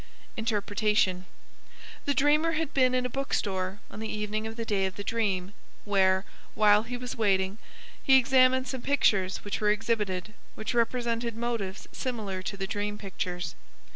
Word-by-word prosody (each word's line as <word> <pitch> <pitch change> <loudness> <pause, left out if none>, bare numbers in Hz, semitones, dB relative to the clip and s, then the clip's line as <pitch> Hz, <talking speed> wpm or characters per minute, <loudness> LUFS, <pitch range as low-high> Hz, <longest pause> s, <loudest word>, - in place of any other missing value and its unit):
Interpretation. 210 -4 +1 0.8
The 285 - +1
dreamer 300 +5 +3
had 320 -2 -2
been 255 -2 +3
in 250 0 +1
a - - +2
book 270 +2 -2
store 190 0 -2
on 205 - -8
the 220 0 -4
evening 215 +1 -2
of 225 - -7
the 230 -1 -4
day 195 -3 +1
of 190 - -7
the 200 - -5
dream, 200 -4 -1 0.3
where, 190 -1 +3 0.3
while 210 -1 +6
he 245 +2 -5
was 250 0 -5
waiting, 195 -1 +1 0.4
he 265 -1 +6
examined 260 0 +4
some 255 0 -4
pictures 200 -10 +2
which 205 - -3
were 210 - +3
exhibited, 210 -3 0 0.2
which 220 - -3
represented 235 -1 0
motives 230 -5 -3
similar 215 -7 -3
to 200 +2 -5
the 195 - -2
dream 205 +1 -3
pictures. 180 -4 -4
215 Hz, 165 wpm, -28 LUFS, 195-245 Hz, 0.8 s, while